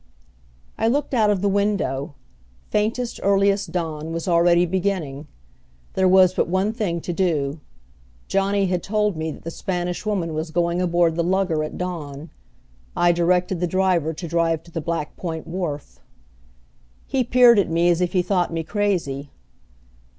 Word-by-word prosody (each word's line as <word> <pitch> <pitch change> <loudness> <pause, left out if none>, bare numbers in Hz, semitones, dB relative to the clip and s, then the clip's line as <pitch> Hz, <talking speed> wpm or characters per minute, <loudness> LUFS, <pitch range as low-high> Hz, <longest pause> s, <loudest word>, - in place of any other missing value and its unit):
I 225 - +2
looked 280 +4 0
out 220 -4 +3
of 200 -3 +1
the - - +3
window. 190 -8 -1 0.6
Faintest, 225 +3 -1
earliest 200 0 +2
dawn 160 -3 -3
was 165 +2 -4
already 170 0 +4
beginning. 175 -6 -2 0.7
There 190 0 +2
was 185 -1 +6
but - - 0
one 190 +5 0
thing 190 -8 -2
to 175 - -4
do. 155 -5 0 0.7
Johnny 195 0 +1
had 180 -1 -1
told 210 0 0
me 160 0 -3
that - - -9
the 165 - -5
Spanish 180 0 -3
Woman 190 -6 -1
was 155 +1 -3
going 170 +2 0
aboard 170 -2 +2
the 170 - +2
lugger 180 -3 +1
at 155 - -6
dawn. 160 -4 -5 0.6
I 175 0 +4
directed 175 +1 +1
the 180 - 0
driver 180 -3 +1
to 170 +2 -7
drive 165 -1 0
to 170 - -17
the 165 - -3
Black 160 -1 -3
Point 160 -3 -5
wharf. 165 -4 -5 1.1
He 265 -1 0
peered 245 -2 +6
at 190 - +1
me 170 +1 +2
as 175 0 +2
if 180 -1 0
he 180 -2 +2
thought 180 -2 0
me 165 -1 -2
crazy. 165 -9 -1
175 Hz, 165 wpm, -22 LUFS, 165-195 Hz, 1.1 s, was